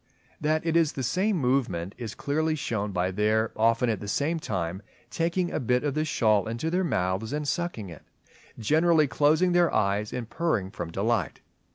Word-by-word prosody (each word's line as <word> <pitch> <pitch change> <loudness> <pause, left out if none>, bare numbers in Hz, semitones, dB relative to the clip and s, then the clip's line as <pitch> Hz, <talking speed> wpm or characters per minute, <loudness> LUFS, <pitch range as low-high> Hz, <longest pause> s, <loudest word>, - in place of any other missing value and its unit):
That 155 +2 0
it 165 -1 0
is 165 -3 +3
the 135 - -4
same 185 - +1
movement 125 - 0
is 115 -3 -6
clearly 155 +2 0
shown 110 -8 -2
by 90 0 0
their 110 +3 +1
often 115 +2 +2
at 110 -4 0
the 105 - -7
same 155 +10 0
time 90 - -3 0.3
taking 175 +2 0
a - - -1
bit 125 0 +1
of 145 -2 0
the 155 +2 0
shawl 110 -9 +2
into 120 +8 -3
their 185 +2 +1
mouths 95 - -1
and 150 0 -2
sucking 170 - -2
it; 80 - -11 0.6
generally 155 +7 +3
closing 155 +6 +3
their 175 -1 +3
eyes 100 +1 0
and 120 -3 -4
purring 115 - -1
from 90 -3 -5
delight. 100 +1 -1
125 Hz, 185 wpm, -27 LUFS, 105-160 Hz, 0.6 s, is